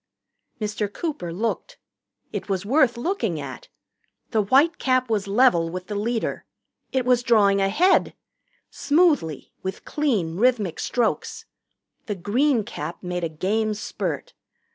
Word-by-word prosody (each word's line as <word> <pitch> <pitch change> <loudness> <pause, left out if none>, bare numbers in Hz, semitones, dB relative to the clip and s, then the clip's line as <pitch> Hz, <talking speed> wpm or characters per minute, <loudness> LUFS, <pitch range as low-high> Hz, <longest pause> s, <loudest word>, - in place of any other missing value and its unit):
Mr. 210 -1 -2
Cooper 240 - -4
looked. 230 - -3 0.6
It - - -5
was 190 0 -1
worth 260 0 +3
looking 235 - -1
at. 135 -3 -8 0.6
The 220 - +3
white 275 +11 +3
cap 255 -2 +1
was 205 -2 0
level 200 -6 +4
with 180 +1 -6
the 210 - -6
leader 225 +3 -2 0.5
it 260 -2 0
was 250 -1 +4
drawing 205 -5 +4
ahead 310 - +3 0.6
smoothly, 290 - +1
with 190 0 -5
clean, 210 - 0
rhythmic 220 -6 +1
strokes. 240 -3 -1 0.6
The 205 - -2
green 230 +7 +1
cap - - -7
made 180 -1 -3
a 165 - 0
game 210 +7 -1
spurt. - - -4
215 Hz, 130 wpm, -24 LUFS, 190-255 Hz, 0.6 s, level